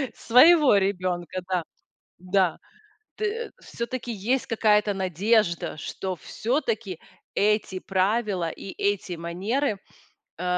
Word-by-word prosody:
своего 290 +2 +6
ребёнка. 185 -2 -2
Да. 180 -2 0 0.5
Да. 185 -1 +1 0.6
Т 435 +2 -3
всё-таки 240 +1 -5
есть 235 +6 -1
какая-то 210 -2 +2
надежда, 185 -2 +1
что 190 +5 -4
всё-таки 225 - -2 0.4
эти 210 -2 +1
правила 195 -2 0
и 190 - -8
эти 200 -2 0
манеры, 200 - -1 0.6
э, 180 - -4
200 Hz, 95 wpm, -25 LUFS, 185-230 Hz, 0.6 s, своего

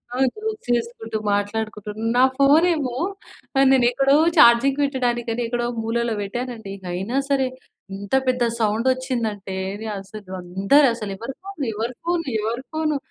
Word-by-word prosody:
ఆ! - - -3 0.2
జోక్స్ 430 - -5
ఏసుకుంటూ 225 -1 -6 0.2
మాట్లాడుకుంటూ 210 0 -2 0.3
నా 250 - +6 0.2
ఫోనేమో 290 -2 +3 0.6
ఆహ్, 275 - +6
నేనెక్కడో 265 +2 +4 0.2
చార్జింగ్ 265 +4 +6
వెట్టడానికని 245 -4 -1
ఎక్కడో 240 0 -1 0.2
మూలలో 235 +1 0
వెట్టానండి. 225 -1 -5 0.2
అయినా 195 +9 -2
సరే 270 -2 +2 0.5
ఇంత 200 +5 -2
పెద్ద 250 -1 +2 0.2
సౌండ్ 220 +2 +1
ఒచ్చిందంటే, 230 -7 -3 0.3
నె 220 - -5
అసలు 195 0 -11
అందరు 195 +11 +3
అసలు 210 -4 -5
ఎవరి 230 +6 -6
ఫోను? 390 -8 -5
ఎవరి 230 +4 -3
ఫోను? 345 -1 0 0.2
ఎవరి 230 +4 -3
ఫోనను? 310 -2 0
240 Hz, 135 wpm, -22 LUFS, 215-270 Hz, 0.6 s, నా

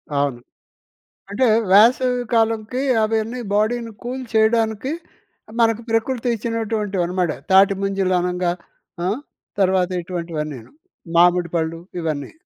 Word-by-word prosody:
అవును. 140 -3 0 0.9
అంటే 230 +6 +2 0.3
వేసవి 245 +4 +5
కాలంకి 225 +1 +1 0.2
అవన్నీ 220 +3 -1
బాడీని 225 +2 0
కూల్ 255 +2 -4
చేయడానికి, 220 +3 +2 0.7
మనకు 225 0 +2
ప్రకృతి 225 +2 0
ఇచ్చినటువంటివనమాట. 205 -6 -1 0.2
తాటి 195 +1 +6
ముంజలనంగా, 180 -2 0 0.5
ఆ! - - +1 0.5
తర్వాత 185 -1 +2
ఇటువంటివన్నీనూ, 165 - -5 0.5
మామిడి 175 0 +4
పండ్లు 165 0 -2 0.2
ఇవన్నీ. 155 -4 -3
205 Hz, 90 wpm, -21 LUFS, 175-225 Hz, 0.9 s, తాటి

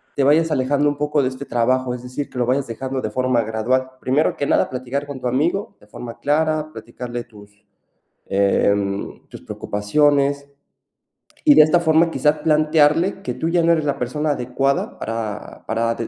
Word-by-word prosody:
te 140 - +1
vayas 160 +3 +3
alejando 145 +1 +1
un 145 - -4
poco 150 0 0
de 130 - +1
este 130 +2 -8
trabajo, 125 +1 0
es 125 - -10
decir, 130 +3 -5
que - - -11
lo 120 - +2
vayas 130 +2 0
dejando 130 +3 -4
de 110 - -4
forma 130 0 +1
gradual. 125 +4 -1
Primero 135 +4 +1
que 140 - -1
nada, - - +2
platicar 130 +3 -4
con 140 -2 -7
tu 125 - -2
amigo 170 - -1
de 105 - -21
forma 115 +2 -9
clara, 155 +1 0
platicarle 120 +2 -7
tus, 105 -2 -18 0.6
em, 100 0 0
tus - - -11
preocupaciones, 140 +6 0 1.0
y 295 -2 +7
de - - +9
esta 155 +3 +3
forma, 165 0 +3
quizá, 150 -1 +1
plantearle 155 +4 +3
que - - -3
tú 160 - -3
ya 170 0 +2
no 170 - +4
eres 160 -2 0
la 140 -1 -1
persona 150 +5 -1
adecuada 135 +1 -1
para 110 -2 -5
para 115 +1 0
de 115 - -4
135 Hz, 185 wpm, -20 LUFS, 120-150 Hz, 1.0 s, de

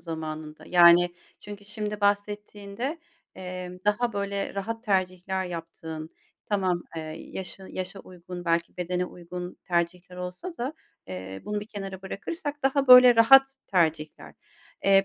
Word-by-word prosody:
zamanında? 155 -2 -6
Yani, 175 0 +6 0.3
çünkü 205 0 -10
şimdi 210 0 -4
bahsettiğinde, 205 +6 -1 0.4
emm, 180 -1 -7
daha 230 +3 +1
böyle 200 0 -2
rahat 225 +4 -4
tercihler 190 -1 0
yaptığın, 165 -2 -7 0.4
tamam, 185 -4 0
eee, - - -2 0.3
yaşın 190 0 -6
yaşa 185 +2 -5
uygun 180 -1 -9
belki 170 0 0
bedene 180 0 -1
uygun 180 0 -8
tercihler 180 +1 -1
olsa 180 - -6
da, 255 +4 -2 0.4
eee, 95 +1 -7
bunu 210 0 -2
bir 210 - -8
kenara 195 -3 -7
bırakırsak 290 - -5
daha 270 +1 +2
böyle 250 -1 +10
rahat 270 +4 +7
tercihler. 160 -5 0 0.5
Eee, 195 0 +6
190 Hz, 130 wpm, -27 LUFS, 175-210 Hz, 0.5 s, böyle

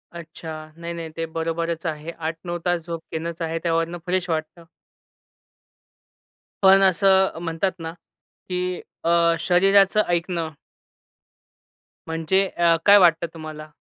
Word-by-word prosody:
अच्छा. 160 -2 -9
नाही, 170 0 -6
नाही 165 -1 -6
ते 165 - -1
बरोबरच 165 +1 -3
आहे. 155 +1 -4
8-9 165 +2 -5
तास 175 -2 0
झोप 165 -1 -6
घेणंच 165 +1 -5
आहे. 165 0 -2
त्यावरनं 165 0 0
फ्रेश 180 0 -1
वाटतं. 160 +2 -3 2.0
पण 195 0 +7
असं 190 -1 +4
म्हणतात 165 +3 -1
ना 165 0 -5 0.6
की 180 0 -2 0.2
अ, 165 - +1 0.3
शरीराचं 195 +3 +4
ऐकणं 170 -1 -1 1.6
म्हणजे 165 +4 +1
अ, 170 -1 +4
काय 205 0 +9
वाटतं 170 -3 +4
तुम्हाला? 155 -1 -8
170 Hz, 115 wpm, -23 LUFS, 165-180 Hz, 2.0 s, काय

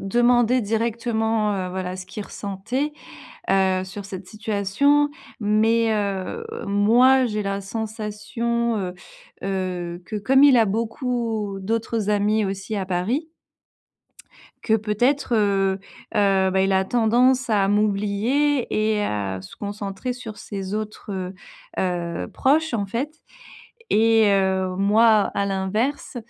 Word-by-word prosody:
demandé 240 +3 +3
directement, 225 -1 0
heu, 185 -1 -3
voilà, 185 0 -4
ce 185 0 -8
qu'il 190 +2 -6
ressentait, 225 +9 -3 0.6
heu, 190 -1 +2
sur 195 +1 -8
cette 190 -2 -8
situation 220 +8 +1 0.3
mais 220 +2 +2
heu, 200 - -2 0.2
moi, 240 +6 +4
j'ai 210 -3 -1
la 195 0 -3
sensation, 220 +2 -2
heu 185 -3 -3 0.5
heu, 180 -2 -3
que 215 - -5
comme 265 +7 +4
il 265 -4 +7
a 225 - +4
beaucoup 225 -1 -2
d'autres 225 0 -1
amis 210 +1 +2
aussi 195 +2 -4
à 195 - -1
Paris, 215 - -2 1.3
que 220 - -1
peut-être, 240 +5 +1
heu 195 -2 +1 0.3
heu, 195 -2 +3
bah, 190 0 +2
il 195 - +2
a 190 0 +2
tendance 245 +2 +3
à 200 -2 +3
m'oublier 215 +7 +1 0.3
et 210 - 0
à 100 - -2
se 95 - -12
concentrer 205 +4 -4
sur 225 -4 -9
ses 195 -2 -6
autres, 215 0 -5
heu 185 0 -4 0.4
heu, 175 -2 -2
proches, 315 +4 +2
en 205 -4 -1
fait 260 +10 -3 0.8
et 225 0 +5
heu, 190 -1 +1
moi, 215 +1 +4
à 200 - +1
l'inverse, 210 +9 -2
210 Hz, 130 wpm, -23 LUFS, 195-235 Hz, 1.3 s, il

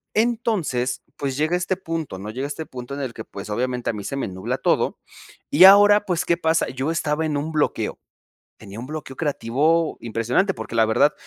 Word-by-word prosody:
Entonces, 215 - 0
pues, 135 -1 -3
llega 155 +3 +1
este 180 +1 -1
punto, 165 - -4
¿no? 105 +3 -6
Llega 130 +4 -3
este 150 +2 -5
punto 125 +1 -7
en 140 - -5
el 130 -4 -4
que, 110 - -7
pues, 100 0 -9
obviamente, 125 +2 -1
a - - -10
mí 105 -2 -6
se 135 - -4
me 135 - -2
nubla 95 +7 -3
todo, - - +1 0.5
y 175 +6 +8
ahora 205 +1 +8
pues, 175 -3 0
¿qué 170 - +2
pasa? 160 -1 +1
Yo 130 +3 -3
estaba 160 -1 0
en 145 -2 -1
un 155 +3 -3
bloqueo, 155 -2 -1 0.6
tenía 100 +3 -10
un 130 - -7
bloqueo 150 -3 -7
creativo, 150 +4 +1
impresionante, 120 - 0
porque, - - -7
la 115 -1 +5
verdad 110 +7 +3
145 Hz, 200 wpm, -23 LUFS, 120-165 Hz, 0.6 s, y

